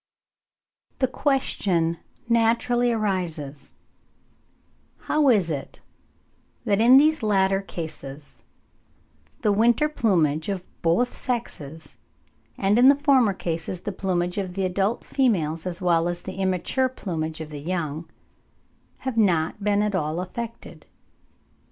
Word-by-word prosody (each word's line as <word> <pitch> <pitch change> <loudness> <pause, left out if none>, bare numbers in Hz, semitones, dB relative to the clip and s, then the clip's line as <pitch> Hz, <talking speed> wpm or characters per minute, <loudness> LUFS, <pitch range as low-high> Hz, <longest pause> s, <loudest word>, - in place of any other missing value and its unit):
The 260 - +2
question 190 - 0 0.3
naturally 235 +1 +2
arises, 170 -10 -3 1.3
how 300 -2 +2
is 195 -9 +3
it 140 -3 -6 0.9
that 205 -1 +2
in 245 +3 +8
these 310 +1 +4
latter 195 -2 +2
cases 155 -6 -8 1.0
the 215 - +2
winter 235 +8 +3
plumage 170 - +1
of 190 -2 -3 0.2
both 230 +10 +2
sexes, 160 - -5 0.6
and 200 +4 +2
in 250 - +7
the 280 - +6
former 270 -7 +3
cases 170 +1 -4
the 205 - -4
plumage 180 -1 -1
of 185 -2 -4
the 195 -1 0
adult 195 +4 -1
females, 175 - 0
as 180 +1 -5
well 170 -2 +2
as 175 0 -5
the 190 0 -7
immature 190 +8 0
plumage 160 -10 -4
of 155 -1 -7
the 145 - -6
young, 160 -1 -3 1.0
have 260 -3 -2
not 185 -1 +1
been 205 0 +2
at 210 -1 -1
all 160 -2 -1
affected? 230 +6 -7
190 Hz, 120 wpm, -24 LUFS, 165-230 Hz, 1.3 s, in